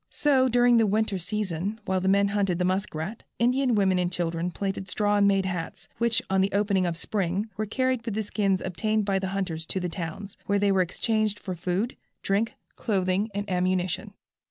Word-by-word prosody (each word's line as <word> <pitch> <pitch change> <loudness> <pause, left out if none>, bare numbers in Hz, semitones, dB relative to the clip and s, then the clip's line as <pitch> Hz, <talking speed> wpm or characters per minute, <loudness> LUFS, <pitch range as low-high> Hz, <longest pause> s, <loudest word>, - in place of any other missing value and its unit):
So 265 -3 +3
during 245 0 +5
the 225 -1 +4
winter 210 -1 +1
season, 200 +1 -2
while 190 -1 0
the 190 - -1
men 200 +1 +4
hunted 200 -3 +1
the 180 - 0
muskrat, 185 +1 -2 0.2
the - - 0
Indian 250 0 +3
women 190 -3 +3
and 175 0 0
children 170 -1 -1
plaited 195 +1 -4
straw 205 +1 +1
and 200 0 +5
made 195 -1 +3
hats, 180 -3 -4
which, 235 -1 +2
on 190 0 +2
the 195 +1 +1
opening 200 -2 +2
of 165 -1 -2
spring, 195 +3 -1
were 215 +1 -2
carried 255 +1 0
with 230 -3 -3
the 220 - 0
skins 200 -2 0
obtained 215 +3 0
by 195 -1 +1
the 190 - -2
hunters, 185 -4 -2
to 190 - -1
the 180 -1 -2
towns, 185 +4 -6
where 200 - +2
they 200 0 +3
were 190 -1 +3
exchanged 215 +3 0
for 185 - -5
food, 180 +7 -2 0.3
drink, 205 +4 0 0.2
clothing 195 0 0
and 205 0 -2
ammunition. 185 +2 -1
195 Hz, 205 wpm, -26 LUFS, 185-215 Hz, 0.3 s, during